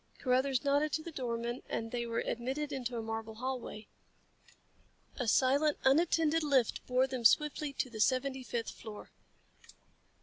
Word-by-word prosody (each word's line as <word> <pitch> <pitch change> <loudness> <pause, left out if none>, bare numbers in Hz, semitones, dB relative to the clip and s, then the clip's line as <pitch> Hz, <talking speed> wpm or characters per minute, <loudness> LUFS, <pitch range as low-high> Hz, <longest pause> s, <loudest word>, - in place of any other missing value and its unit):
Carruthers 260 0 +1
nodded 285 +2 +2
to 315 - -1
the 335 - -7
doorman 240 -3 -3
and 225 0 -3
they 240 -1 -2
were 230 0 -1
admitted 265 +5 -2
into 250 -3 -3
a 225 - -3
marble 225 0 -5
hallway. 250 -3 -5 1.3
A 250 - -2
silent, 280 +6 +3
unattended 325 +2 +3
lift 275 -6 +2
bore 255 +1 +3
them 260 -2 -4
swiftly 300 +4 +3
to 265 - -1
the 230 -3 -9
seventy 265 +2 +1
fifth 235 -2 -3
floor. 215 -2 -10
255 Hz, 145 wpm, -33 LUFS, 235-285 Hz, 1.3 s, silent